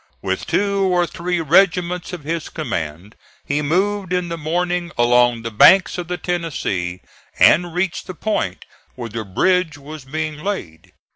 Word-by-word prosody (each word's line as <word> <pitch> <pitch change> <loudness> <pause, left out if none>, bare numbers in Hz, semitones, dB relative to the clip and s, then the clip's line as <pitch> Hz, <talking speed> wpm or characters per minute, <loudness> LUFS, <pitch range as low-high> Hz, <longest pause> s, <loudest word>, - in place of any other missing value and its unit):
With - - -2
two 200 0 +1
or 180 -2 +2
three 175 0 -3
regiments 180 +2 +2
of 175 -5 -7
his 165 +2 -3
command 90 - -5 0.3
he 145 +1 0
moved 190 +5 0
in 180 -1 -1
the 170 - -3
morning 175 +2 -1
along 120 -1 +3
the 115 - -4
banks 185 - +5
of 175 - -5
the 180 0 -3
Tennessee, 105 - -3 0.4
and 175 +1 +4
reached 180 -1 -2
the 185 - -7
point 160 - -2 0.3
where 120 -2 -6
the 110 +1 -4
bridge 160 - +1
was 145 0 -10
being 155 +2 -4
laid. 90 - -5
165 Hz, 155 wpm, -20 LUFS, 125-180 Hz, 0.4 s, banks